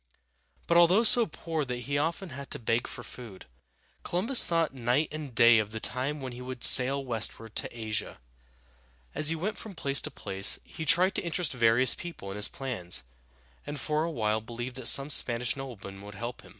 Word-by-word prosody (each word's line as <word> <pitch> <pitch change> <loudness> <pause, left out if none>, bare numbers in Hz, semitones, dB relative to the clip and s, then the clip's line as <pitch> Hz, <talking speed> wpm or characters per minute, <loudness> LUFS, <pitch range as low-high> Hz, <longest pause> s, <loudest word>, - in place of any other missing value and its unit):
But 170 - +2
although 175 +6 +5
so 235 0 +6
poor 160 -1 -4
that 125 -2 -5
he 140 - -3
often 165 +5 -2
had 140 0 -9
to - - -2
beg 115 0 -1
food, 115 -7 -10 0.6
Columbus 225 +9 +2
thought 165 -4 0
night 130 +4 0
and 150 -5 -8
day 120 -2 +6
of 105 -1 -3
the 110 - -6
time 130 +5 -4
when 130 -1 -6
he 125 - -10
would 125 -1 -7
sail 135 +2 +6
westward 115 -2 -4
to 120 - -5
Asia. 110 -1 -4 1.0
As 155 - +5
he 165 - 0
went 190 +7 -4
from 215 -4 -9
place 140 -3 +2
to - - -3
place, 95 -1 -1
he 160 - -8
tried 185 +4 +3
to - - -3
interest 170 -3 -2
various 120 +1 +3
people 165 - -9
in - - -7
his 105 +2 +2
plans, 90 - -4 0.6
and 145 0 -4
for 155 0 -1
a 165 - -2
while 110 -7 -1
believed 120 +3 -8
that 130 -3 0
some 140 +2 +7
Spanish 120 -2 +3
noblemen 115 -8 -9
would 100 0 -11
help 120 +3 -7
him. - - -17
130 Hz, 195 wpm, -28 LUFS, 115-155 Hz, 1.0 s, some